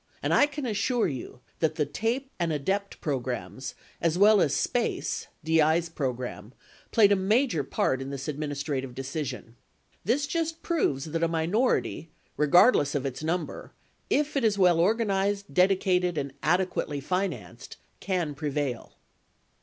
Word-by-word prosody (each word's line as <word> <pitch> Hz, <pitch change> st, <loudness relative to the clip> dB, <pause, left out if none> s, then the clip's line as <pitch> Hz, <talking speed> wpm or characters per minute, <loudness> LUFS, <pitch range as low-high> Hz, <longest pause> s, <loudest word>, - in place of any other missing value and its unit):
And -, -, +1 dB
I 290 Hz, -, +5 dB
can 290 Hz, -1 st, -5 dB
assure 230 Hz, +2 st, +1 dB
you, 130 Hz, -3 st, -7 dB, 0.2 s
that 160 Hz, -, +1 dB
the 150 Hz, -, +1 dB
TAPE 235 Hz, -, -2 dB
and 170 Hz, -2 st, 0 dB
ADEPT 190 Hz, +7 st, -2 dB
programs, 130 Hz, -, -4 dB, 0.3 s
as 165 Hz, 0 st, +1 dB
well 205 Hz, +1 st, +6 dB
as 145 Hz, -, +2 dB
SPACE 455 Hz, -, -1 dB, 0.2 s
(DI's 160 Hz, +1 st, +3 dB
program) 125 Hz, -, -4 dB, 0.4 s
played 205 Hz, -3 st, +5 dB
a -, -, +6 dB
major 200 Hz, -, +2 dB
part 130 Hz, 0 st, 0 dB
in 135 Hz, -, -5 dB
this 140 Hz, 0 st, -5 dB
administrative 145 Hz, -3 st, -3 dB
decision. 135 Hz, -3 st, -5 dB, 0.5 s
This 255 Hz, -, +1 dB
just 325 Hz, +1 st, -2 dB
proves 145 Hz, -, 0 dB
that 165 Hz, +1 st, -3 dB
a 165 Hz, -, +3 dB
minority, 165 Hz, +2 st, 0 dB, 0.3 s
regardless 150 Hz, -, +4 dB
of 140 Hz, -1 st, -1 dB
its 135 Hz, +2 st, -4 dB
number, 170 Hz, +2 st, -3 dB, 0.4 s
if 295 Hz, 0 st, +1 dB
it 275 Hz, -, +1 dB
is 215 Hz, -3 st, +2 dB
well 180 Hz, -3 st, +4 dB
organized, 200 Hz, 0 st, +1 dB
dedicated, 180 Hz, -2 st, +2 dB
and 140 Hz, -2 st, -3 dB
adequately 175 Hz, -3 st, 0 dB
financed, 185 Hz, +7 st, -4 dB, 0.2 s
can 175 Hz, -6 st, -1 dB
prevail. 145 Hz, -4 st, -3 dB
170 Hz, 140 wpm, -27 LUFS, 140-205 Hz, 0.5 s, well